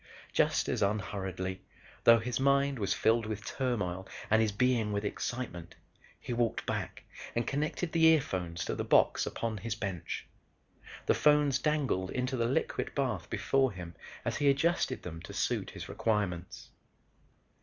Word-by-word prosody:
Just -, -, +2 dB
as -, -, -1 dB
unhurriedly, 95 Hz, -2 st, -2 dB, 0.4 s
though 115 Hz, 0 st, +9 dB
his 115 Hz, +2 st, -2 dB
mind 140 Hz, -1 st, +3 dB
was 100 Hz, -3 st, -1 dB
filled 110 Hz, +4 st, +2 dB
with 110 Hz, -2 st, -5 dB
turmoil 100 Hz, -8 st, -2 dB, 0.2 s
and 110 Hz, +1 st, +5 dB
his 110 Hz, -2 st, +2 dB
being 115 Hz, 0 st, +2 dB
with 100 Hz, 0 st, -1 dB
excitement, 90 Hz, -7 st, -4 dB, 0.4 s
he 125 Hz, -, -4 dB
walked 120 Hz, -1 st, 0 dB
back -, -, -3 dB, 0.3 s
and 120 Hz, -, +1 dB
connected 150 Hz, +4 st, -1 dB
the 165 Hz, -1 st, +4 dB
earphones 95 Hz, -, +2 dB
to -, -, -2 dB
the -, -, -2 dB
box -, -, +3 dB
upon 115 Hz, -2 st, -3 dB
his 110 Hz, +2 st, -3 dB
bench. 95 Hz, -7 st, -4 dB, 0.8 s
The -, -, +4 dB
phones 150 Hz, -3 st, +4 dB
dangled 135 Hz, -12 st, 0 dB
into 130 Hz, +1 st, -1 dB
the 115 Hz, -2 st, +1 dB
liquid 130 Hz, -, -1 dB
bath 110 Hz, -, -1 dB
before 135 Hz, -4 st, +1 dB
him 90 Hz, -2 st, -8 dB, 0.3 s
as -, -, -1 dB
he 145 Hz, -1 st, +3 dB
adjusted 140 Hz, -1 st, +1 dB
them 80 Hz, -2 st, -7 dB
to -, -, -9 dB
suit -, -, -1 dB
his -, -, -8 dB
requirements. 95 Hz, -5 st, -2 dB
115 Hz, 155 wpm, -31 LUFS, 95-135 Hz, 0.8 s, though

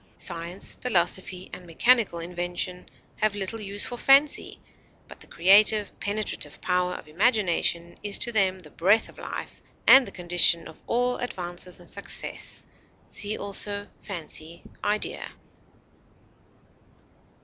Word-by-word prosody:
Science, 175 Hz, +2 st, -5 dB
philosophy, 185 Hz, -4 st, -1 dB
and 180 Hz, -, -10 dB
mechanical 225 Hz, +2 st, +2 dB
invention 175 Hz, +1 st, -5 dB, 0.3 s
have 215 Hz, -1 st, 0 dB
little 205 Hz, +3 st, -4 dB
use 200 Hz, 0 st, 0 dB
for 245 Hz, -1 st, -5 dB
fancy, 280 Hz, +2 st, +4 dB, 0.5 s
but -, -, -13 dB
the -, -, -15 dB
creative, 205 Hz, +4 st, +5 dB
penetrative 205 Hz, +1 st, -4 dB
power 180 Hz, 0 st, 0 dB
of -, -, -10 dB
imagination 175 Hz, -2 st, +1 dB
is 205 Hz, -1 st, +1 dB
to 240 Hz, -, +1 dB
them 195 Hz, -4 st, +2 dB
the 160 Hz, -5 st, -12 dB
breath 200 Hz, +6 st, +2 dB
of -, -, -16 dB
life, -, -, -7 dB, 0.2 s
and 265 Hz, -1 st, +8 dB
the -, -, -7 dB
condition 175 Hz, -1 st, +3 dB
of 160 Hz, -, -14 dB
all 245 Hz, +1 st, 0 dB
advance 175 Hz, -7 st, -5 dB
and 175 Hz, -, -15 dB
success. 200 Hz, -, -3 dB, 0.5 s
See 210 Hz, +1 st, -1 dB
also 205 Hz, 0 st, -2 dB
FANCY; 170 Hz, -3 st, -4 dB, 0.2 s
IDEA. 210 Hz, +1 st, -2 dB
190 Hz, 125 wpm, -26 LUFS, 175-215 Hz, 0.5 s, and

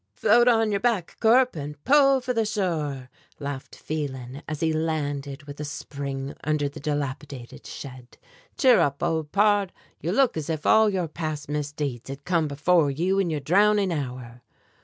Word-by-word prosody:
"Float 240 Hz, +3 st, +4 dB
on 225 Hz, -3 st, +4 dB
your 200 Hz, -, +1 dB
back, 220 Hz, -6 st, 0 dB
Corp, 250 Hz, +2 st, +4 dB
and 150 Hz, -1 st, -6 dB
pull 275 Hz, 0 st, +5 dB
for 250 Hz, 0 st, -2 dB
the 225 Hz, -2 st, +1 dB
shore!" 160 Hz, -, -2 dB, 0.3 s
laughed 140 Hz, -2 st, -6 dB
Phelan 135 Hz, -3 st, -5 dB
as 155 Hz, -1 st, -5 dB
he 160 Hz, -1 st, +2 dB
landed 145 Hz, -3 st, -2 dB
with 145 Hz, 0 st, -10 dB
a -, -, -3 dB
spring 140 Hz, -1 st, -5 dB
under 150 Hz, -1 st, 0 dB
the 140 Hz, -, -8 dB
dilapidated 140 Hz, -3 st, -5 dB
shed. 130 Hz, -3 st, -10 dB, 0.4 s
"Cheer 255 Hz, -4 st, +6 dB
up, 140 Hz, +2 st, 0 dB
old 160 Hz, -3 st, -1 dB
pard; 205 Hz, -1 st, +3 dB, 0.3 s
you 170 Hz, -, -1 dB
look 260 Hz, +4 st, +3 dB
as 155 Hz, 0 st, -4 dB
if 155 Hz, -2 st, -3 dB
all 220 Hz, -1 st, +5 dB
your 185 Hz, -4 st, -1 dB
past 155 Hz, -2 st, -5 dB
misdeeds 145 Hz, -4 st, -3 dB
had 140 Hz, +1 st, -8 dB
come 170 Hz, -4 st, +1 dB
before 145 Hz, +2 st, +2 dB
you 175 Hz, +8 st, 0 dB
in 190 Hz, -3 st, +1 dB
your 155 Hz, -2 st, -2 dB
drowning 200 Hz, +5 st, +3 dB
hour." 125 Hz, -4 st, -5 dB
155 Hz, 170 wpm, -25 LUFS, 140-200 Hz, 0.4 s, Cheer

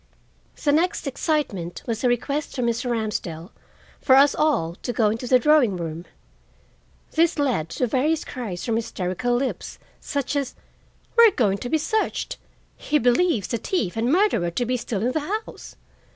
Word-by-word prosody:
The 290 Hz, -, +3 dB
next 330 Hz, +4 st, +1 dB
excitement 270 Hz, -, -2 dB
was 230 Hz, 0 st, -3 dB
a -, -, +4 dB
request 280 Hz, +5 st, -1 dB
from 250 Hz, -3 st, -1 dB
Mr. 235 Hz, +1 st, -1 dB
Ramsdell 210 Hz, -6 st, -3 dB, 0.5 s
for 260 Hz, -, +5 dB
us 280 Hz, +1 st, +6 dB
all 280 Hz, -, +1 dB
to -, -, -3 dB
go 220 Hz, -3 st, +2 dB
into 230 Hz, +3 st, -4 dB
the 255 Hz, -, +6 dB
drawing 255 Hz, -7 st, +3 dB
room. 165 Hz, 0 st, -5 dB, 1.1 s
This 330 Hz, +1 st, +2 dB
led 250 Hz, -, 0 dB
to 250 Hz, -, -1 dB
various 290 Hz, +7 st, 0 dB
cries 210 Hz, -9 st, -5 dB
from 225 Hz, -2 st, 0 dB
hysterical 230 Hz, +1 st, -2 dB
lips, 260 Hz, +2 st, -3 dB, 0.2 s
such 285 Hz, 0 st, -3 dB
as, 280 Hz, -3 st, -2 dB, 0.6 s
"We 465 Hz, -, +10 dB
are -, -, +6 dB
going 205 Hz, -, +1 dB
to 245 Hz, -, -5 dB
be 315 Hz, -, +2 dB
searched!" 370 Hz, +9 st, -1 dB, 0.4 s
"He 300 Hz, -, 0 dB
believes 245 Hz, -, +2 dB
the 235 Hz, -, 0 dB
thief 215 Hz, -, -2 dB
and 230 Hz, +3 st, 0 dB
murderer 330 Hz, -, +2 dB
to 240 Hz, +9 st, -2 dB
be 250 Hz, +2 st, 0 dB
still 220 Hz, -4 st, -3 dB
in 250 Hz, -, +1 dB
the 315 Hz, -, 0 dB, 0.3 s
house!" -, -, -12 dB
245 Hz, 170 wpm, -23 LUFS, 215-290 Hz, 1.1 s, We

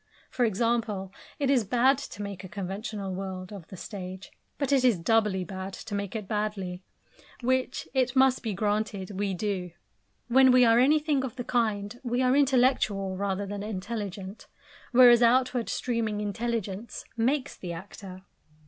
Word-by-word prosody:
For 245 Hz, -, +1 dB
example, 215 Hz, -3 st, -1 dB, 0.2 s
it 280 Hz, -1 st, +1 dB
is 255 Hz, -5 st, +3 dB
bad 250 Hz, +6 st, +3 dB
to 210 Hz, -7 st, -7 dB
make 200 Hz, -2 st, -6 dB
a 185 Hz, -, -8 dB
conventional 200 Hz, +1 st, -5 dB
world 185 Hz, 0 st, -6 dB
of 190 Hz, -5 st, -9 dB
the 190 Hz, -, -10 dB
stage, 185 Hz, -1 st, -8 dB, 0.3 s
but 280 Hz, -1 st, -1 dB
it 270 Hz, -2 st, +4 dB
is 245 Hz, -6 st, +4 dB
doubly 210 Hz, 0 st, +2 dB
bad 190 Hz, +2 st, -6 dB
to -, -, -8 dB
make 200 Hz, +1 st, -3 dB
it 210 Hz, -3 st, -4 dB
badly 205 Hz, -4 st, -3 dB, 0.6 s
which, 255 Hz, +1 st, 0 dB
it 255 Hz, -2 st, +1 dB
must 265 Hz, -1 st, +4 dB
be 220 Hz, -4 st, -3 dB
granted, 205 Hz, -1 st, -2 dB
we 200 Hz, -2 st, 0 dB
do. 185 Hz, -2 st, -2 dB, 0.6 s
When 260 Hz, +1 st, +6 dB
we 250 Hz, 0 st, +6 dB
are 230 Hz, 0 st, +5 dB
anything 295 Hz, +1 st, +3 dB
of 255 Hz, -3 st, -5 dB
the 245 Hz, -, -4 dB
kind, 220 Hz, -2 st, -1 dB
we 245 Hz, +1 st, 0 dB
are 255 Hz, +1 st, +3 dB
intellectual 250 Hz, -8 st, +2 dB
rather 200 Hz, +1 st, -2 dB
than 200 Hz, 0 st, -5 dB
intelligent; 205 Hz, -1 st, -5 dB, 0.4 s
whereas 245 Hz, -1 st, +8 dB
outward 250 Hz, 0 st, +3 dB
streaming 230 Hz, -4 st, -1 dB
intelligence 210 Hz, 0 st, -3 dB
makes 260 Hz, +4 st, 0 dB
the 180 Hz, -, -7 dB
actor. 185 Hz, +2 st, -9 dB
215 Hz, 155 wpm, -28 LUFS, 195-245 Hz, 0.6 s, whereas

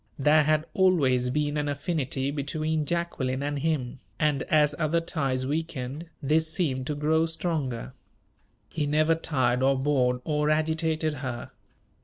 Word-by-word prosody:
There 150 Hz, +2 st, +5 dB
had 155 Hz, +1 st, +2 dB
always 140 Hz, -10 st, +3 dB
been 150 Hz, +2 st, 0 dB
an 145 Hz, 0 st, -1 dB
affinity 140 Hz, -2 st, -1 dB
between 155 Hz, +1 st, -2 dB
Jacqueline 140 Hz, -6 st, -1 dB
and 145 Hz, 0 st, -2 dB
him, 140 Hz, -5 st, -1 dB, 0.2 s
and, 150 Hz, -2 st, +2 dB
as 150 Hz, -1 st, +4 dB
other 160 Hz, +1 st, +2 dB
ties 135 Hz, -6 st, -1 dB
weakened, 150 Hz, 0 st, -3 dB, 0.2 s
this 160 Hz, +3 st, +2 dB
seemed 135 Hz, -7 st, -1 dB
to 150 Hz, -, -2 dB
grow 160 Hz, +2 st, +2 dB
stronger. 150 Hz, -, -3 dB, 0.7 s
He 150 Hz, -3 st, -2 dB
never 155 Hz, +2 st, +3 dB
tired 130 Hz, -6 st, 0 dB
or 135 Hz, +1 st, +3 dB
bored 130 Hz, -3 st, +1 dB
or 150 Hz, -1 st, +1 dB
agitated 155 Hz, 0 st, +1 dB
her. 125 Hz, -3 st, -5 dB
150 Hz, 140 wpm, -27 LUFS, 135-160 Hz, 0.7 s, There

